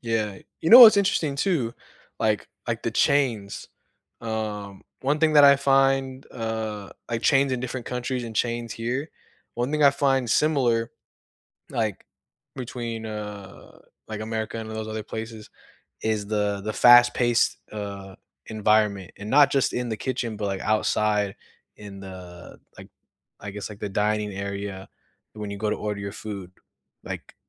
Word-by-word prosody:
Yeah. 110 Hz, -4 st, -2 dB, 0.2 s
You 160 Hz, -, 0 dB
know 245 Hz, +3 st, +12 dB
what's 220 Hz, -3 st, +11 dB
interesting, 170 Hz, -8 st, +1 dB
too 140 Hz, -8 st, 0 dB, 0.5 s
like 110 Hz, -1 st, +1 dB, 0.2 s
like -, -, -2 dB
the -, -, 0 dB
chains. 115 Hz, -8 st, 0 dB, 0.5 s
Um, 105 Hz, -3 st, -5 dB, 0.2 s
one 140 Hz, +3 st, 0 dB
thing 160 Hz, 0 st, +3 dB
that 150 Hz, -1 st, +7 dB
I 140 Hz, 0 st, +8 dB
find, 135 Hz, -1 st, +2 dB
uh 110 Hz, -3 st, -4 dB, 0.2 s
like, 115 Hz, 0 st, -2 dB
chains 135 Hz, -1 st, +3 dB
in 125 Hz, -, -1 dB
different 125 Hz, 0 st, -5 dB
countries 125 Hz, 0 st, -3 dB
and 115 Hz, -2 st, -7 dB
chains 120 Hz, -1 st, -1 dB
here 125 Hz, +7 st, -3 dB, 0.4 s
one 120 Hz, +3 st, -2 dB
thing 150 Hz, 0 st, 0 dB
I 140 Hz, -, +8 dB
find 135 Hz, -3 st, +1 dB
similar, 120 Hz, -7 st, +2 dB, 0.8 s
like, 110 Hz, -4 st, -2 dB, 0.5 s
between, 120 Hz, -3 st, -5 dB
uh, 105 Hz, -2 st, -9 dB, 0.3 s
like, 110 Hz, -1 st, -6 dB
America 110 Hz, 0 st, -4 dB
and 110 Hz, 0 st, -7 dB
those 110 Hz, 0 st, -5 dB
other 110 Hz, 0 st, -4 dB
places 110 Hz, 0 st, -7 dB, 0.5 s
is 110 Hz, -2 st, -1 dB
the 105 Hz, -1 st, -1 dB
the 110 Hz, +1 st, -3 dB
fast-paced, 120 Hz, 0 st, +5 dB
uh, 100 Hz, -2 st, -7 dB, 0.3 s
environment, 105 Hz, -3 st, +1 dB
and 105 Hz, -, -7 dB
not 145 Hz, 0 st, +6 dB
just 135 Hz, -2 st, +1 dB
in 125 Hz, 0 st, -2 dB
the 110 Hz, -, -2 dB
kitchen, 120 Hz, -4 st, -3 dB
but, 105 Hz, -, -2 dB
like, 95 Hz, -1 st, -3 dB
outside 105 Hz, -1 st, +1 dB, 0.4 s
in 100 Hz, -2 st, -10 dB
the, 90 Hz, -2 st, -11 dB, 0.2 s
like, -, -, -11 dB, 0.5 s
I 105 Hz, -, -6 dB
guess, 105 Hz, +1 st, -6 dB
like, 105 Hz, -1 st, -11 dB
the 105 Hz, -, -3 dB
dining 105 Hz, +1 st, 0 dB
area 100 Hz, 0 st, -5 dB, 0.5 s
when 105 Hz, -1 st, -6 dB
you 100 Hz, -, -6 dB
go 105 Hz, +1 st, -1 dB
to -, -, -1 dB
order 105 Hz, -1 st, -4 dB
your 100 Hz, 0 st, -5 dB
food, 100 Hz, -4 st, -7 dB, 0.5 s
like, -, -, -7 dB
110 Hz, 155 wpm, -25 LUFS, 105-125 Hz, 0.8 s, know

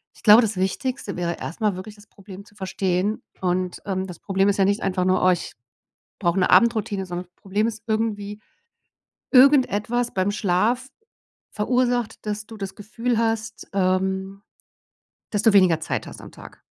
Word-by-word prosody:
Ich -, -, -20 dB
glaube, 215 Hz, +2 st, +8 dB
das 220 Hz, -3 st, -1 dB
Wichtigste 200 Hz, +3 st, -2 dB
wäre 170 Hz, -1 st, -2 dB
erst 170 Hz, -, -7 dB
mal 210 Hz, -3 st, +1 dB
wirklich 190 Hz, +3 st, -9 dB
das 205 Hz, 0 st, -18 dB
Problem 195 Hz, -1 st, -12 dB
zu 205 Hz, -, -22 dB
verstehen. 190 Hz, +1 st, -1 dB, 0.2 s
Und, 180 Hz, 0 st, -1 dB
ähm, 190 Hz, -1 st, -2 dB
das 180 Hz, -3 st, -10 dB
Problem 195 Hz, -1 st, +1 dB
ist 200 Hz, -, 0 dB
ja 195 Hz, -, +4 dB
nicht 200 Hz, +3 st, +1 dB
einfach 185 Hz, -1 st, 0 dB
nur: 185 Hz, 0 st, +2 dB
„Oh, 185 Hz, -, +6 dB
ich 175 Hz, -, -3 dB, 0.7 s
brauche 175 Hz, 0 st, +1 dB
'ne 180 Hz, -, +2 dB
Abendroutine“, 205 Hz, -1 st, +3 dB
sondern 180 Hz, 0 st, -5 dB
das 175 Hz, -, -44 dB
Problem 205 Hz, +2 st, 0 dB
ist 225 Hz, -1 st, -5 dB
irgendwie: 215 Hz, -2 st, -2 dB, 0.9 s
Irgendetwas 245 Hz, -4 st, +4 dB
beim 190 Hz, +1 st, +1 dB
Schlaf 215 Hz, +6 st, 0 dB, 0.7 s
verursacht, 245 Hz, +1 st, 0 dB
dass 210 Hz, 0 st, -3 dB
du 225 Hz, -, -11 dB
das 195 Hz, -2 st, -6 dB
Gefühl 230 Hz, +3 st, -2 dB
hast, 225 Hz, -1 st, -2 dB
ähm, 190 Hz, +1 st, 0 dB, 0.9 s
dass 205 Hz, -1 st, -1 dB
du 225 Hz, -, +5 dB
weniger 185 Hz, -5 st, +5 dB
Zeit 160 Hz, -, -3 dB
hast -, -, -10 dB
am -, -, -12 dB
Tag. -, -, -14 dB
200 Hz, 170 wpm, -23 LUFS, 185-220 Hz, 0.9 s, glaube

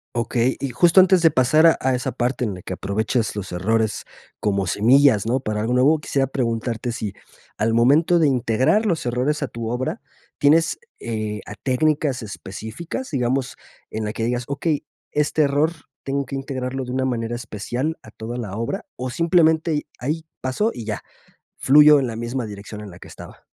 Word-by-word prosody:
Okey, 120 Hz, +2 st, 0 dB
y 140 Hz, -, -2 dB
justo 170 Hz, +9 st, +5 dB
antes 185 Hz, -1 st, +5 dB
de 165 Hz, -, +6 dB
pasar 150 Hz, +5 st, +4 dB
a 165 Hz, -, +7 dB
a 130 Hz, 0 st, +2 dB
esa 125 Hz, -, -2 dB
parte 125 Hz, +1 st, -1 dB
en 105 Hz, -, -2 dB
la 90 Hz, -, -9 dB
que 95 Hz, -, -6 dB
aprovechas 110 Hz, +4 st, -1 dB
los 100 Hz, -3 st, -5 dB
errores 110 Hz, +4 st, 0 dB, 0.4 s
como 100 Hz, -2 st, 0 dB
semillas, 120 Hz, +2 st, +4 dB
¿no? 125 Hz, +4 st, +1 dB
Para 110 Hz, -4 st, -3 dB
algo 115 Hz, +3 st, 0 dB
nuevo 135 Hz, +5 st, +4 dB
quisiera 135 Hz, -3 st, -1 dB
preguntarte, 120 Hz, -2 st, -2 dB
si 105 Hz, -3 st, -4 dB, 0.4 s
al 110 Hz, +1 st, +1 dB
momento 145 Hz, +9 st, +4 dB
de 155 Hz, -, +4 dB
integrar 130 Hz, -, +2 dB
los 170 Hz, -6 st, 0 dB
errores 125 Hz, +6 st, 0 dB
a 140 Hz, -, -1 dB
tu 115 Hz, -2 st, -5 dB
obra, 125 Hz, +1 st, -3 dB, 0.4 s
tienes, 160 Hz, +3 st, +3 dB, 0.2 s
eh, 110 Hz, -2 st, -4 dB
a 105 Hz, -, -7 dB
técnicas 140 Hz, +1 st, 0 dB
específicas, 110 Hz, -, -7 dB
digamos, 130 Hz, -2 st, -1 dB, 0.3 s
en 110 Hz, 0 st, -4 dB
la 105 Hz, -, -3 dB
que 115 Hz, -, -3 dB
digas: 120 Hz, +1 st, -1 dB
"Okey, 150 Hz, +1 st, -1 dB, 0.3 s
este 150 Hz, +1 st, +1 dB
error 145 Hz, +3 st, +2 dB, 0.3 s
tengo 140 Hz, 0 st, -2 dB
que 135 Hz, -, -5 dB
integrarlo 135 Hz, -1 st, -4 dB
de 125 Hz, -, -6 dB
una 130 Hz, +1 st, 0 dB
manera 120 Hz, -2 st, -2 dB
especial 120 Hz, +7 st, -4 dB
a 110 Hz, -, -13 dB
toda 115 Hz, +3 st, -6 dB
la 105 Hz, -5 st, -5 dB
obra", 115 Hz, +1 st, -3 dB
o, 130 Hz, +1 st, -3 dB
simplemente 165 Hz, 0 st, +3 dB
y, 150 Hz, -, -2 dB
ahí 155 Hz, +6 st, -3 dB, 0.2 s
pasó 130 Hz, -, 0 dB
y 115 Hz, -, -6 dB
ya, 105 Hz, -1 st, -3 dB, 0.5 s
fluyó 150 Hz, +1 st, +7 dB
en 130 Hz, -, -1 dB
la 115 Hz, -1 st, -5 dB
misma 120 Hz, +2 st, -3 dB
dirección 105 Hz, 0 st, -8 dB
en 105 Hz, -, -9 dB
la 85 Hz, -, -13 dB
que -, -, -12 dB
estaba. -, -, -12 dB
125 Hz, 190 wpm, -22 LUFS, 110-145 Hz, 0.5 s, a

